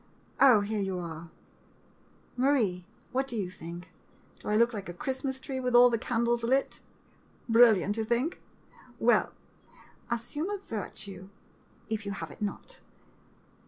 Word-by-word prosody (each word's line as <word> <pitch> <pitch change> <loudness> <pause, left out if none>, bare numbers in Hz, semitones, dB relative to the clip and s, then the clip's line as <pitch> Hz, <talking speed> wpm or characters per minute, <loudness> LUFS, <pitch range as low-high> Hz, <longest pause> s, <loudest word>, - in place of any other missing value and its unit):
Oh, 250 -6 +7
here 210 +1 -2
you 190 -2 -2
are 165 -1 -7 0.5
— - - -33
Marie, 240 -9 +1 0.3
what 265 +1 0
do 240 - -3
you 185 -4 -2
think? 170 0 -9 0.5
Do - - -11
I 210 - +2
look 235 +2 +4
like 200 -4 -6
a 175 - -7
Christmas 265 +4 -3
tree 265 0 -4
with 250 -1 0
all 245 0 +8
the 230 - +1
candles 235 0 0
lit? 260 +4 +1 0.7
Brilliant, 225 -4 +5
you 225 - 0
think? 240 +9 -1 0.6
Well - - +3 0.4
— - - -25
assume 245 - -3
a 410 - -2
virtue, 200 - -7 0.6
if 220 -1 -2
you 200 - -2
have 165 -6 -6
it - - -14
not! 210 - -5
230 Hz, 155 wpm, -29 LUFS, 195-255 Hz, 0.7 s, all